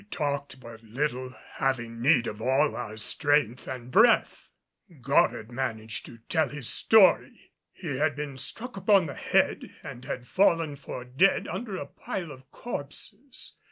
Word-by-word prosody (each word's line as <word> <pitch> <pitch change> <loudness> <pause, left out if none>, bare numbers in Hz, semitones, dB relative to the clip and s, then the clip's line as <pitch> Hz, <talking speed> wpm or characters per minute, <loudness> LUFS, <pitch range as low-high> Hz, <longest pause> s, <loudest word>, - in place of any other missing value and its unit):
We - - -21
talked 140 -7 -3
but 115 -2 -12
little, 125 +2 -3 0.2
having 115 -3 -1
need 125 -2 +4
of 105 -1 -6
all 135 +5 +2
our 110 +1 -6
strength 135 +1 0
and 125 -1 -7
breath. - - +3 0.5
Goddard 110 +2 +1
managed 110 -3 -4
to 115 - -12
tell 160 -2 +1
his 145 -5 -4
story. 215 -4 +4 0.2
He 150 -8 -5
had 150 +1 +1
been 145 -2 -5
struck 245 - -2
upon 195 -1 +4
the 140 - -5
head - - 0
and 125 -2 -9
had 125 -1 -5
fallen 165 -3 +2
for 130 -3 -8
dead 135 +11 +2
under 215 -6 -5
a - - -5
pile 175 -5 -6
of 130 -1 -14
corpses. 235 - -7
140 Hz, 155 wpm, -27 LUFS, 125-165 Hz, 0.5 s, need